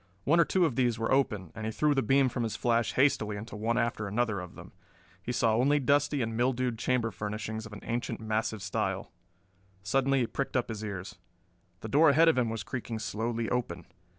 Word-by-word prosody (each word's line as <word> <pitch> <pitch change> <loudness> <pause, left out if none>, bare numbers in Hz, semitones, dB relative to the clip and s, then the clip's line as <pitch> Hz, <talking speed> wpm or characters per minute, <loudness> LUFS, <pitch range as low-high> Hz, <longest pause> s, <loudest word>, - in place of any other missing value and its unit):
One 165 +4 +3
or 170 - +6
two 185 +1 +2
of 145 -7 -1
these 120 -3 +1
were 115 - -2
open, 105 - +1
and 110 0 -7
he - - -2
threw 150 +7 +2
the 135 - +2
beam 135 +3 +3
from 125 -1 -3
his 115 -2 -2
flash 115 0 +1
hastily 110 -6 +2
into 110 +2 -8
one 115 +3 -1
after 115 -3 -1
another 110 0 0
of 90 -1 -9
them. - - -11 0.5
He 120 - -4
saw 115 -2 +2
only 140 +5 +3
dusty 145 0 +2
and 115 0 -3
mildewed 125 -1 0
chamber 120 -3 0
furnishings 110 +1 -5
of 110 - -13
an 105 - -9
ancient 120 0 -3
massive 110 -1 -2
style. 100 - -2 0.7
Suddenly 135 +5 +2
he - - +2
pricked 135 +3 -2
up 120 - -1
his 110 -2 -5
ears. 95 -3 -6 0.6
The - - -5
door 150 +7 +5
ahead 160 +4 +6
of 160 - +2
him 120 -2 +1
was 110 -2 -4
creaking 120 -1 -5
slowly 115 +1 -2
open. 90 -9 -2
115 Hz, 210 wpm, -29 LUFS, 110-130 Hz, 0.7 s, or